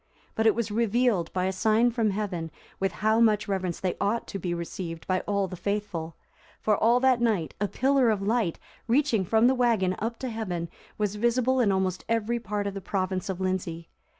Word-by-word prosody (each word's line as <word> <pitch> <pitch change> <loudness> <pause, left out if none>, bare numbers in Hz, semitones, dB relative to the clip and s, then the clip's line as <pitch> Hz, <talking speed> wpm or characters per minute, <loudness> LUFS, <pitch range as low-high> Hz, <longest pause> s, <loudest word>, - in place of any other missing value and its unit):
But 220 0 +2
it 220 - +4
was 225 -2 -2
revealed 225 -4 +1
by 185 0 -1
a 190 - +1
sign 220 +5 +3
from 225 -2 +1
Heaven 190 -5 -3 0.3
with 195 -1 0
how 220 +1 +4
much 215 -2 +3
reverence 185 -3 -2
they 185 -2 -2
ought 220 +4 0
to 195 - -4
be 175 -1 -3
received 170 -1 -5
by 185 0 +1
all 200 -1 +1
the 185 - -7
faithful; 185 -4 -3 0.4
for 215 - +2
all 235 +4 +3
that 260 -2 +3
night, 210 -9 +1
a 205 - +2
pillar 265 +2 +2
of 215 -2 +1
light, 205 -3 0 0.3
reaching 240 -4 +2
from 220 +5 +3
the 255 - +5
wagon 230 -8 +2
up 230 +2 -3
to 260 - -4
heaven, 180 -7 -3 0.3
was 210 -1 -1
visible 245 +3 +2
in 220 -5 +3
almost 190 -1 -1
every 230 +1 0
part 210 -2 -3
of 200 - -2
the 195 - -6
province 185 0 -2
of 190 -1 -3
Lindsey. 175 -3 -3
205 Hz, 205 wpm, -27 LUFS, 185-230 Hz, 0.4 s, the